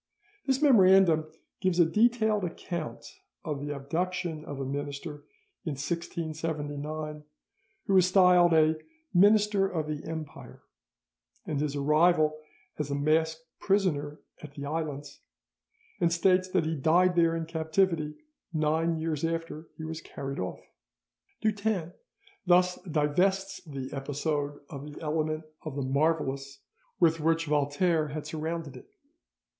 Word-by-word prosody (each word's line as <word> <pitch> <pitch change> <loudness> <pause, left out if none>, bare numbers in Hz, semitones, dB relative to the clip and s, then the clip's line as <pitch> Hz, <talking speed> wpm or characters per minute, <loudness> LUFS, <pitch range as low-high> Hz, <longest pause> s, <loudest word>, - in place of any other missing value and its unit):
This 265 +2 +1
memorandum 190 - +5 0.3
gives 185 -2 +1
a 170 - +7
detailed 220 +2 +2
account 170 -1 -5 0.4
of 150 -3 -3
the 145 - -4
abduction 165 +3 -3
of 145 -1 -6
a 135 - -2
minister 145 +2 -5 0.4
in 155 - -3
1679, 155 -1 -4 0.6
who 195 - +3
is 185 -1 +5
styled 180 -2 +6
a 160 0 +4 0.4
"minister 205 +1 +5
of 160 -5 -2
the 150 -1 -4
Empire," 160 -2 -8 0.8
and 150 -3 -2
his 150 -1 -1
arrival 155 +1 +3 0.4
as 150 -1 -2
a 140 - -1
masked 160 +2 +1 0.2
prisoner 155 -7 0 0.2
at 150 -2 -11
the 140 - -6
islands, 145 -2 -4 0.8
and 170 -1 +2
states 185 +2 +3
that 185 -3 +1
he 160 +1 -1
died 175 +5 +3
there 165 -1 +3
in 165 -1 -2
captivity 160 -1 0 0.4
nine 160 +1 +1
years 160 -2 -2
after 165 -1 -3
he 160 - -7
was 160 +1 -5
carried 135 -2 -6
off. 90 - -4 0.8
Dutens 205 -5 0 0.5
thus 180 0 +4
divests 185 +7 +1
the 135 -4 -6
episode 145 +1 -2
of 145 0 -8
the - - -10
element 155 0 -1 0.2
of 155 -4 -6
the 140 - -2
marvellous 140 -1 0 0.4
with 165 -1 +4
which 165 +1 +1
Voltaire 150 +2 +1
had 150 +1 -5
surrounded 160 -2 -4
it. 125 - -13
160 Hz, 130 wpm, -29 LUFS, 150-175 Hz, 0.8 s, a